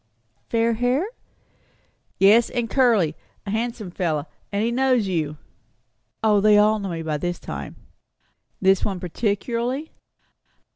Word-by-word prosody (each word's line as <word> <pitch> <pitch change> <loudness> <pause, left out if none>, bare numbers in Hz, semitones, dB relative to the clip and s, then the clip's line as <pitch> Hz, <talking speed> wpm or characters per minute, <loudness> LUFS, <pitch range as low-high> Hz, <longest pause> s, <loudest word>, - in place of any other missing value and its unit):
"Fair 230 0 +2
hair?" 245 - +1 1.1
"Yes, 215 +5 +5
and 240 -2 -2
curly. 220 - +3 0.3
A 200 - -4
handsome 220 -3 -3
fellow. 160 -5 -1 0.3
And 200 +1 0
he 230 - +1
knows 255 -3 +2
you." 155 -5 -2 0.9
"O, 210 -2 +4
they 210 0 +6
all 215 +1 +4
know 200 -1 -4
me 165 -2 -4
by 155 -2 -1
this 175 +3 -3
time." - - -7 0.8
"This 190 0 +3
one 195 -3 -2
particularly?" 235 - -2
210 Hz, 130 wpm, -23 LUFS, 180-235 Hz, 1.1 s, they